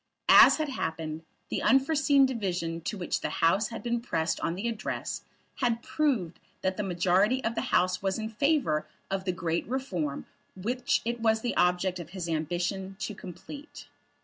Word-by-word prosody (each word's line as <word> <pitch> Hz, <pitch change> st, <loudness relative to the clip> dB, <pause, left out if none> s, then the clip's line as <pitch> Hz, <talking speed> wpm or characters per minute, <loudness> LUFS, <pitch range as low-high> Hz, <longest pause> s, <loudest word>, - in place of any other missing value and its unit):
As -, -, +9 dB
had 310 Hz, -2 st, -1 dB
happened, 160 Hz, -, -3 dB, 0.3 s
the -, -, -1 dB
unforeseen 275 Hz, +2 st, +4 dB
division 180 Hz, -9 st, -2 dB
to 210 Hz, -, -2 dB
which 175 Hz, -, -2 dB
the -, -, -1 dB
House 190 Hz, +7 st, +2 dB
had 230 Hz, -, -7 dB
been 240 Hz, -1 st, -1 dB
pressed 165 Hz, -8 st, -1 dB
on 170 Hz, -, -1 dB
the 200 Hz, +6 st, -3 dB
Address 225 Hz, -2 st, -3 dB, 0.4 s
had 235 Hz, -2 st, 0 dB
proved 250 Hz, -, 0 dB, 0.2 s
that 190 Hz, 0 st, +1 dB
the 210 Hz, -, -2 dB
majority 190 Hz, +6 st, +2 dB
of 225 Hz, -, 0 dB
the -, -, -1 dB
House 185 Hz, 0 st, +2 dB
was 195 Hz, -1 st, 0 dB
in 220 Hz, -1 st, -3 dB
favour 225 Hz, -, +1 dB, 0.2 s
of 195 Hz, -1 st, -2 dB
the 185 Hz, -, +1 dB
great 170 Hz, -1 st, -2 dB
reform 185 Hz, -, -3 dB, 0.3 s
which 240 Hz, +7 st, 0 dB
it 235 Hz, +1 st, -2 dB
was 220 Hz, -1 st, +2 dB
the 240 Hz, -, -2 dB
object 180 Hz, +1 st, +2 dB
of 170 Hz, -2 st, -8 dB
his 175 Hz, -2 st, -3 dB
ambition 175 Hz, +4 st, -2 dB
to 215 Hz, -, -3 dB
complete. 280 Hz, -, -10 dB
195 Hz, 175 wpm, -29 LUFS, 175-240 Hz, 0.4 s, As